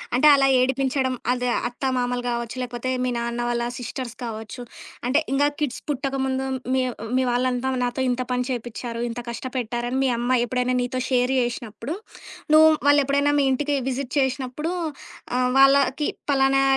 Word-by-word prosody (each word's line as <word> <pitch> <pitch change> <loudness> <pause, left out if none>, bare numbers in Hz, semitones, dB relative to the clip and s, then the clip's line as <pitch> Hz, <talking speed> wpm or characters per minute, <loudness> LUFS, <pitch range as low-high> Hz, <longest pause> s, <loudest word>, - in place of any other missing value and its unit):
అంటే 260 +5 +5
అలా 275 -1 +3
ఏడిపించడం 265 0 +1 0.2
అద 250 0 -3 0.3
అత్త 245 - -13
మామలు 245 0 -1
గావచ్చు, 235 0 -3
లేపోతే 245 +1 -4 0.2
మీ 250 - 0
నాన్న 235 0 -3
వాళ్ళ 235 0 0
సిస్టర్స్ 250 0 -5
కావచ్చు. 225 +2 -6 0.5
అంటే, 270 +4 +3
ఇంకా 285 +1 +3
కిడ్స్ 285 -4 -2
పుట్టకముందు 265 -1 -1 0.3
మీ 260 - +3 0.4
మీ 260 - +3
వాళ్ళంతా 250 +1 0 0.2
నాతో 245 +2 -2
ఇంత 250 0 0
పని 250 0 0
చేపించారు 240 -1 -4
ఇంత 235 +1 -5
కష్టపెట్టారని 240 0 -3
మీ - - +3
అమ్మ 240 +1 -2 0.2
ఎప్పుడైనా 250 +1 0
నీతో 245 +1 -2
షేర్ 250 0 +2
జేషినప్పుడు 240 +1 -3 0.6
నువ్వు 310 +1 +8 0.2
వాళ్ళు 290 0 +6
ఎప్పుడైనా 280 +1 +2
మీ - - +3
ఇంటికి 290 +2 0
విజిట్ 260 0 -3
చేసినప్పుడు 265 +4 -1 0.7
ఆహ్, 250 0 +2
వాళ్ళకి 275 +1 +4 0.2
పలానా 270 0 +3
255 Hz, 150 wpm, -24 LUFS, 245-270 Hz, 0.7 s, నువ్వు